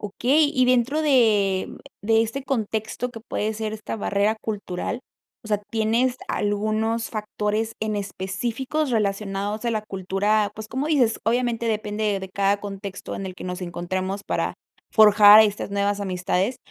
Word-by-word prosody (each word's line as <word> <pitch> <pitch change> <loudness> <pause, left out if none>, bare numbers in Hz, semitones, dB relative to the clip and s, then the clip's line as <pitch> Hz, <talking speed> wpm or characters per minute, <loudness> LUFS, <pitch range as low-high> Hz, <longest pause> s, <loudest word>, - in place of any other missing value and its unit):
Okey, 270 +9 +2
y 255 -1 +4
dentro 255 +5 +2
de 210 -9 +3 0.3
de 225 +1 +3
este 260 +5 -4
contexto 225 -1 -2
que 225 - -10
puede 215 -1 -2
ser 215 0 -3
esta 220 +1 -5
barrera 205 +1 +1
cultural, 210 +2 -4 0.4
o - - -9
sea, 210 -1 +1
¿tienes 230 +3 +1
algunos 215 +2 -1
factores 215 +1 -2
en 215 -1 -1
específicos 230 +9 -3
relacionados 205 0 -1
a 235 - +1
la 215 -2 -1
cultura?, 200 +1 0
pues, 215 0 -8
cómo 265 +6 -2
dices, 255 -8 +2
obviamente, 235 0 0
depende 210 -1 -1
de 190 - -7
cada 200 +1 +1
contexto 195 -1 -6
en 195 - -5
el 185 - -7
que - - -9
nos 180 +1 -5
encontramos 185 +3 -3
para - - -1 0.4
forjar 210 -1 +8
estas 210 -2 +1
nuevas 200 0 0
amistades, 185 +4 -1
215 Hz, 150 wpm, -24 LUFS, 200-230 Hz, 0.4 s, forjar